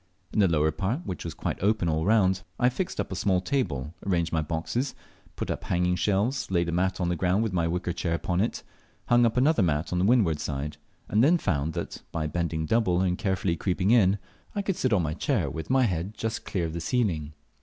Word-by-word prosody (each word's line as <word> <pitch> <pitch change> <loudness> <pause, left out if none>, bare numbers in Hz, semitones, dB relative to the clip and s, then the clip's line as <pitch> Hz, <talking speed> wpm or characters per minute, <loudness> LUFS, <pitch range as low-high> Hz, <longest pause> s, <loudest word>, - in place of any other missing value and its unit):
In - - +1
the 100 - +6
lower 80 -2 +2
part 105 - -2
(which 90 - -5
was 85 -1 -5
quite - - -3
open 105 -2 +2
all 80 0 0
round) 95 -3 +3 0.2
I 125 - +4
fixed 175 +9 -4
up - - -2
a - - -2
small 95 0 +2
table, 85 - -2
arranged 85 -4 0
my 80 - +2
boxes, 85 - -2 0.4
put - - -3
up - - -4
hanging 90 0 +1
shelves, 105 +8 0
laid 85 -2 +1
a - - -1
mat 95 +2 0
on 90 -1 0
the 90 - +1
ground 90 +5 +1
with 110 -4 -2
my 85 -2 +1
wicker 90 +1 -2
chair 85 0 -1
upon 90 +3 -1
it, 110 - -2 0.5
hung 120 0 +5
up 115 - -2
another 140 0 +4
mat 80 -1 0
on 90 - +1
the 90 - +2
windward 100 -10 +3
side, 75 +1 -4 0.3
and 105 +2 +3
then 165 +6 +5
found 80 - -1
that, - - -5
by 80 -2 -2
bending 80 0 -1
double 95 -2 +2
and 90 -1 0
carefully 95 -4 0
creeping 95 +3 0
in, 105 -5 +5 0.4
I 205 - -1
could 195 -2 -1
sit 130 - 0
on 100 -5 +3
my 75 -1 -1
chair 80 - 0
with 80 -1 -6
my 130 0 +4
head 95 -1 -1
just 110 0 -3
clear 90 -4 -1
of 80 - -4
the 85 - -4
ceiling. 80 -11 0
90 Hz, 230 wpm, -27 LUFS, 85-110 Hz, 0.5 s, the